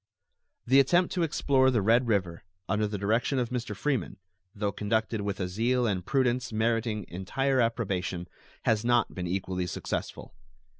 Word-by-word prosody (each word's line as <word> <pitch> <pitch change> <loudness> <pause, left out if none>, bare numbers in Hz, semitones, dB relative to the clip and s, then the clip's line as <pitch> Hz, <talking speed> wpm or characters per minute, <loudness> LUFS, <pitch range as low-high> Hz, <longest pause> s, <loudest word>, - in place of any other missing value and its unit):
The 130 +3 +5
attempt 175 +6 +3
to 180 - 0
explore 140 -4 +3
the 115 -6 +1
Red 115 +4 +4
River, 95 -6 0 0.2
under 105 0 +1
the 105 0 -4
direction 115 +7 +1
of 125 -2 0
Mr. 120 -4 -3
Freeman, 130 -3 -2 0.4
though 100 -1 -1
conducted 110 +1 -1
with 100 -1 -3
a 90 - -1
zeal 120 +6 +1
and 95 -5 -1
prudence 125 +1 0
meriting 110 -2 0
entire 130 +9 0
approbation, 95 -6 -1 0.4
has 110 -1 +2
not 120 -2 +2
been 90 -1 -4
equally 90 0 -2
successful. - - -5
110 Hz, 155 wpm, -28 LUFS, 100-125 Hz, 0.4 s, The